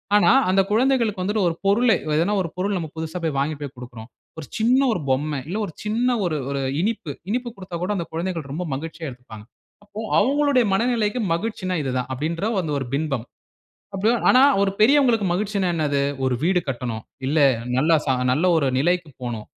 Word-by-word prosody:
ஆனா, 210 - +5 0.2
அந்த 195 +1 +4
குழந்தைகளுக்கு 230 -4 +2
வந்துட்டு 205 +1 0
ஒரு 165 - -4
பொருள, 225 +5 +4 0.2
எதனா 170 +7 +2
ஒரு 170 - -4
பொருள் 200 +2 -1
நம்ம 165 -3 -4
புதிசா 160 +2 -4 0.2
வாங்கி 150 +2 -1
போய் 140 -1 -6
கொடுக்கிறோம். 120 -2 -10 0.3
ஒரு 155 - -7
சின்ன 240 +4 +3
ஒரு 180 - -2
பொம்மை, 145 +2 0
இல்ல 185 +6 -3
ஒரு 170 - -9
சின்ன 235 +4 +1
ஒரு 155 -3 -1
ஒரு 140 -1 -2 0.2
இனிப்பு 205 -7 -2 0.2
இனிப்பு 245 +2 -1
கொடுத்தா 185 -2 -8
கூட 185 - -1
அந்த 170 - -3
குழந்தைகள் 165 -4 -3
ரொம்ப 165 +6 -3
மகிழ்ச்சியா 160 +3 -5
எடுத்துப்பாங்க. 120 -4 -12 0.4
அப்போ 205 +1 -10 0.2
அவங்களுடைய 275 +3 +3
மனநிலைக்கு 230 +1 +1
மகிழ்ச்சினா 185 0 -3
இது 135 - -2
தான் 125 - -2
அப்படின்றத, 165 - -2
அந்த 160 - -4
ஒரு 135 - -4
பிம்பம், 140 -5 -1 0.7
அப்படியும் 220 +5 +1
ஆனா, 255 - +6 0.2
ஒரு 195 - +2
பெரியவங்களுக்கு 240 -2 +4
மகிழ்ச்சினா 195 0 -1
என்னது? 145 -3 0 0.2
"ஒரு 130 -1 +1
வீடு 180 +1 +3
கட்டணும், 120 -3 -4 0.2
இல்லை 145 +1 +4 0.3
நல்ல 160 +4 +4
ச - - -12 0.2
நல்ல 150 +7 +1
ஒரு 145 -4 +1
நிலைக்கு 175 +2 +1
போணும், 115 -3 -4
180 Hz, 180 wpm, -22 LUFS, 145-215 Hz, 0.7 s, ஆனா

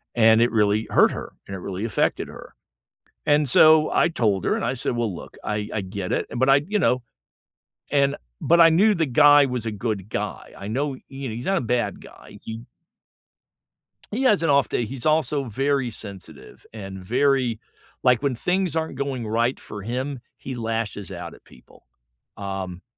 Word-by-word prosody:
and 110 -1 +5
it 120 - +3
really 105 0 +2
hurt - - +5
her, - - -7
and 95 - -6
it 95 - -6
really 95 +3 -4
affected 110 - 0
her, - - -12 0.7
and 145 -1 +3
so, 155 +4 +6
I - - +3
told 105 - 0
her, - - +2
and - - -3
I 125 - 0
said, 120 0 -1
"Well, 115 -4 -1
look, - - -10
I 105 0 -3
I 105 - -1
get 95 0 -5
it," - - 0
and, 120 - -5
but 130 +2 +3
I, 135 - +7
you 210 0 0
know, 125 -7 +2 0.9
and, 140 -1 +2 0.3
but 170 +1 +4
I 165 - +8
knew 200 +7 +4
the 165 - +1
guy 145 +2 +6
was 125 -3 -3
a 115 - -2
good 105 -1 -4
guy, - - -5
I 100 - -7
know, 135 +6 -1
you 135 -1 -6
know, 110 - -5
he's 120 +2 -6
not 195 - +2
a - - 0
bad 120 0 -1
guy, - - -14
he 115 +1 -7 1.5
He 230 +6 -2
has 210 -9 +3
an 165 - +2
off 140 -1 +3
day, 120 - -1
he's 130 +4 -6
also 155 -2 +2
very 135 +2 0
sensitive 95 -10 -9
and 95 -3 -8
very 130 0 +1 0.4
like, 125 -1 +3
when 140 -4 0
things 180 +5 0
aren't 160 0 -2
going 135 -4 -3
right 115 +4 0
for 105 -1 -9
him, 125 +4 -4 0.2
he 130 - -7
lashes 115 -4 -3
out 85 -2 -7
at - - -19
people, - - -20 0.5
um, 95 -2 -5
120 Hz, 195 wpm, -23 LUFS, 105-140 Hz, 1.5 s, I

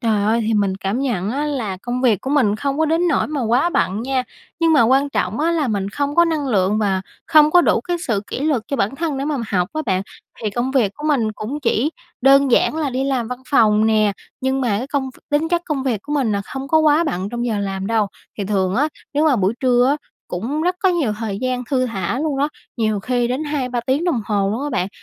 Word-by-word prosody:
Trời 220 -4 +1
ơi, 225 +2 +2
thì 225 - +1
mình 200 -2 +1
cảm 195 +5 -1
nhận 215 -8 -1
á 280 +5 -1
là 230 -10 -2
công 245 +1 -3
việc 225 -7 +3
của 265 - -4
mình 240 -8 +3
không 280 +4 -2
có 320 - +3
đến 330 +3 +2
nỗi - - +1
mà 290 -4 -3
quá 250 +10 +2
bận 185 - 0
nha, 260 +1 0 0.4
nhưng 330 -1 +4
mà 295 -6 +6
quan 270 +5 +3
trọng 210 0 -1
á 330 - +2
là 305 -6 0
mình 200 -2 -1
không 285 +4 -2
có 340 - +7
năng 310 -4 -1
lượng 205 -1 +2
và 195 -3 +1 0.3
không 305 -2 +6
có 355 +2 +6
đủ - - +2
cái 350 -1 -2
sự 215 -5 +1
kỉ - - -5
luật 285 -7 +1
cho 280 - -1
bản 215 +7 -1
thân 310 -4 -2
để 275 - -2
mà 295 -1 -1
học 180 -3 0
á 310 - -2
bạn. 190 0 +1 0.4
Thì 215 - -1
công 240 +5 -1
việc 240 -7 +2
của 295 - -9
mình 230 -7 +1
cũng 225 +8 -5
chỉ 255 +3 +1 0.3
đơn 275 +1 +5
giản 270 - +3
là 300 -4 -1
đi 260 +2 -1
làm 260 -4 -1
văn 250 +1 -6
phòng 215 -4 +4
nè, 215 -2 +3 0.3
nhưng 265 +1 0
mà 250 - 0
cái 250 - -4
công 275 -2 -2
v - - -20
tính 295 +2 +1
chất 345 0 +1
công 295 -5 -2
việc 235 -7 -1
của 295 - -6
mình 265 -7 +1
nà 200 - 0
không 270 0 -5
có 315 - +4
quá 310 +1 +4
bận 190 - -2
trong 240 0 -3
giờ 215 -3 -1
làm 195 -1 -3
đâu, 220 -2 +1 0.3
thì 200 - -2
thường 190 -1 0
á 290 +5 +2 0.3
nếu 300 +2 +2
mà 275 - +3
buổi 200 +2 +1
trưa 250 -1 +3
á 285 - +2 0.3
cũng 255 - -3
rất 360 +1 0
có 380 - +5
nhiều 325 -12 +1
thời 210 -3 -3
gian 255 -1 -1
thư 255 -2 +2
thả 200 +1 -2
luôn 295 -2 -1
đó, 285 +2 +2 0.3
nhiều 215 -3 0
khi 245 +2 0
đến 260 +5 -2
2-3 255 -5 -2
tiếng 275 +6 +1
đồng 335 -10 +1
hồ 200 -2 0
luôn 230 +7 -2
á 295 - -3
bạn. 190 -8 -1
255 Hz, 265 wpm, -20 LUFS, 215-290 Hz, 0.4 s, có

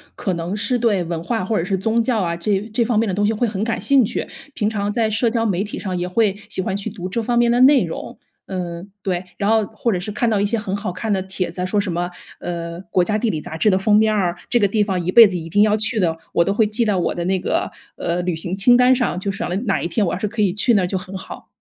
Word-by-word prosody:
可 190 - -2
能 170 +3 -3
是 245 +4 0
对 205 -6 +2
文 165 -1 -4
化 225 -1 -1
或 215 +1 0
者 - - 0
是 190 +2 -1
宗 220 +4 +1
教 235 -1 0
啊， 170 -2 -1
这 190 +3 0
这 235 - +2
方 230 -1 0
面 225 +1 +2
的 190 - -1
东 205 +2 +1
西 215 - +2
会 235 +2 0
很 210 -2 -3
感 230 0 -1
兴 275 -3 +5
趣， - - -3 0.3
平 210 -2 0
常 205 -2 -2
在 220 0 +1
社 225 +2 +1
交 230 0 0
媒 195 -2 0
体 205 - -6
上 185 -2 -3
也 175 0 -2
会 200 +1 +1
喜 190 - 0
欢 190 +1 -2
去 200 +2 -3
读 190 -4 -6
这 230 - -1
方 240 +1 0
面 235 0 +4
的 240 - +2
内 270 +2 +6
容， - - -6 0.3
嗯， 180 0 -5
对。 185 -1 -2
然 200 - 0
后 220 0 +4
或 235 - -2
者 185 - -1
是 195 +4 -5
看 210 +3 0
到 215 - +1
一 205 - +2
些 230 +3 +1
很 200 -3 -3
好 200 -2 -3
看 215 +5 -4
的 190 - 0
帖 190 -2 -4
子， 180 +1 -4
说 205 +2 0
什 200 -2 -1
么， 175 +1 -2 0.3
呃， 170 0 -5
国 180 - +2
家 210 +4 0
地 230 0 0
理 160 - -2
杂 160 - -7
志 210 - +3
的 185 - +3
封 210 +2 +3
面 220 0 +4
儿， 180 -4 0
这 240 - +3
个 200 - +3
地 210 +1 +1
方 190 -3 -2
一 180 - 0
辈 230 +2 +9
子 185 -2 -3
一 165 - -6
定 205 +5 +3
要 210 0 +3
去 220 +1 0
的， 165 -4 +1 0.2
我 170 - +4
都 195 - 0
会 215 +1 +3
记 215 +3 +1
到 210 -3 +1
我 180 - 0
的 170 - -3
那 190 +1 +1
个， 185 - -1 0.3
呃， 170 +1 -2
旅 180 -2 -1
行 175 +3 -3
清 245 +5 +5
单 250 +1 +5
上， 240 -7 -1
就 195 +1 -2
想 195 - -4
着 175 - -2
哪 195 - +1
一 - - 0
天 190 +5 0
我 - - -1
要 - - -2
是 210 - -1
可 215 +1 -3
以 195 -4 +2
去 230 +4 +2
那 200 - +4
儿 180 - 0
就 190 - -1
很 185 +1 -8
好。 190 - -9
200 Hz, 330 characters per minute, -20 LUFS, 180-220 Hz, 0.3 s, 辈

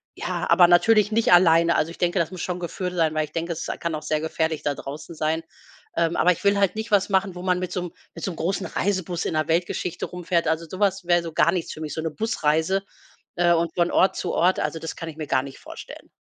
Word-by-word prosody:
ja - - -3
aber 175 -2 +7
natürlich 210 +4 +4
nicht 225 -2 +3
alleine, 170 -1 +5
also, 160 - +1
ich - - -12
denke, 175 +1 +1
das 170 0 0
muss 185 - -7
schon 180 -1 -3
geführt 180 +1 -4
sein, 160 -3 +2
weil 155 0 +1
ich 150 - -18
denke, 170 +1 -3
es 160 - -6
kann 170 -2 -2
auch 155 - -6
sehr 155 -1 -1
gefährlich 160 0 -2
da 145 - 0
draußen 145 +5 -8
sein. 160 +1 -1 0.5
Ähm, 165 0 +1
aber 180 - +5
ich 175 - -4
will 200 0 +3
halt 195 -1 +2
nicht 220 +1 -5
was 200 -1 +3
machen, 190 -1 +1
wo 180 - -8
man 180 0 +1
mit 185 -1 -4
so 180 - -2
'n 175 -1 -6 0.2
mit 165 - -9
so 190 - -1
'n - - -8
großen 175 +4 -2
Reisebus 185 -3 -2
in - - -2
der 155 -1 0
Weltgeschichte 170 +1 -1
herumfährt. 175 -1 -1
Also, 160 +1 0
so 185 - -7
was 195 -2 +1
wär 175 0 +3
so 165 -1 -6
gar 160 +2 +4
nichts 175 -2 -3
für 155 - -10
mich, 155 -1 -4
so 160 - -3
'ne 160 0 -3
Busreise, 165 -2 0 0.5
äh, 175 0 +4
und 165 -1 0
von 175 -1 +2
Ort 190 - +3
zu 180 - -3
Ort. 180 +2 +2
Also, - - -2
das 160 - -6
kann 165 - -6
ich 155 - -10
mir 155 -2 -5
gar 130 - +2
nicht 135 -1 -9
vorstellen. - - -11
170 Hz, 265 wpm, -24 LUFS, 160-185 Hz, 0.5 s, aber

